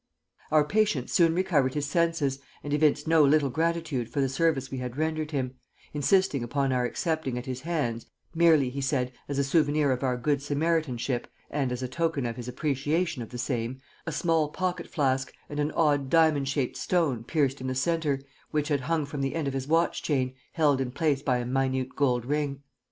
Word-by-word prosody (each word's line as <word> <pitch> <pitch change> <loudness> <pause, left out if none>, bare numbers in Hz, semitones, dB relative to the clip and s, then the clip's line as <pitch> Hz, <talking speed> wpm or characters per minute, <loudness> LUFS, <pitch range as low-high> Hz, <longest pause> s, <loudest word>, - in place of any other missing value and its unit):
Our 155 -1 +5
patient 185 - +1
soon 165 -2 +4
recovered 150 -8 +2
his 145 -1 0
senses 150 -3 +1 0.2
and 145 - -3
evinced 150 +1 +2
no 160 -1 +5
little 145 -1 +4
gratitude 160 -5 -1
for 145 - -3
the 135 -1 +2
service 135 -2 0
we 135 - -3
had 125 0 -5
rendered 155 0 -1
him, 130 -4 -2 0.4
insisting 150 -2 +2
upon 135 +2 0
our 125 -1 +1
accepting 160 -1 -2
at 125 - -5
his 130 -1 -4
hands, 140 -8 -2 0.3
merely, 160 -6 +4
he 140 +2 -4
said, 130 -2 0 0.2
as 140 - -2
a 140 - +3
souvenir 145 0 +2
of 125 - -1
our 130 -2 0
good 140 +3 0
Samaritanship, 145 -4 -1 0.2
and 140 -3 0
as 125 +1 -3
a - - -1
token 160 0 -1
of 115 -1 -2
his 120 0 -7
appreciation 145 +3 -1
of 115 - -7
the 125 - -7
same, 120 0 -2 0.3
a - - -1
small 165 -3 +1
pocket 185 +2 -2
flask 135 -3 0 0.2
and 145 - -5
an 145 0 +1
odd 145 -4 +2
diamond 155 -4 +4
shaped 140 -3 -1
stone 155 -10 0
pierced 140 0 0
in 130 - -3
the 130 - -2
centre, 150 0 0 0.3
which 150 0 -1
had 145 -2 +1
hung 160 +2 0
from 140 0 -5
the 135 +2 -1
end 160 -3 -1
of 135 - -2
his 135 0 -3
watch 165 +2 +2
chain, 130 -4 0 0.2
held 145 -5 +3
in 130 - -1
place 145 +1 0
by 130 -3 +1
a 120 - -3
minute 130 0 -1
gold 125 -4 +1
ring. 140 0 -2
140 Hz, 200 wpm, -27 LUFS, 130-160 Hz, 0.4 s, Our